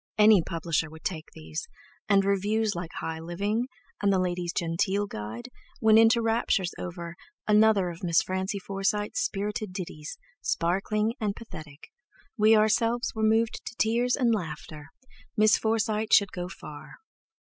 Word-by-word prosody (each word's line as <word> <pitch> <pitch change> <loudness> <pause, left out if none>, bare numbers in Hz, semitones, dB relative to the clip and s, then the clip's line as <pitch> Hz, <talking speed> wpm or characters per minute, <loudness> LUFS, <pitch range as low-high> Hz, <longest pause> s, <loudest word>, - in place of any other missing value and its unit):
Any 210 -3 +7
publisher 165 -2 -2
would 160 +1 -13
take 160 -4 -4
these, 80 0 -6 0.4
and 195 -1 +4
reviews 205 +2 +1
like 175 -1 -5
"High 160 0 -4
Living," 200 +8 -2 0.3
and 200 -1 +3
the 195 - +3
"Ladies' 180 -1 -1
Genteel 180 +5 0
Guide" 110 - -7 0.3
went 220 -1 +6
into 225 +1 +5
raptures 225 -5 +1
over: 170 -1 -6 0.3
"Another 210 -3 +4
of 170 +2 -12
Miss 170 -2 +3
Francie 190 +2 -2
Forsyte's 200 +2 -2
spirited 210 -1 -2
ditties, 160 -5 -6 0.2
sparkling 205 +6 0
and 205 -2 -1
pathetic. 155 -10 -11 0.4
We 220 -1 +5
ourselves 230 +3 +2
were 220 - -4
moved 220 +1 +2
to - - -8
tears 240 +3 +2
and 240 -4 +2
laughter. 155 -5 -5 0.5
Miss 215 0 +6
Forsyte 220 -1 0
should 200 -2 +5
go 180 0 -5
far." 150 -5 -10
200 Hz, 145 wpm, -27 LUFS, 170-220 Hz, 0.5 s, Any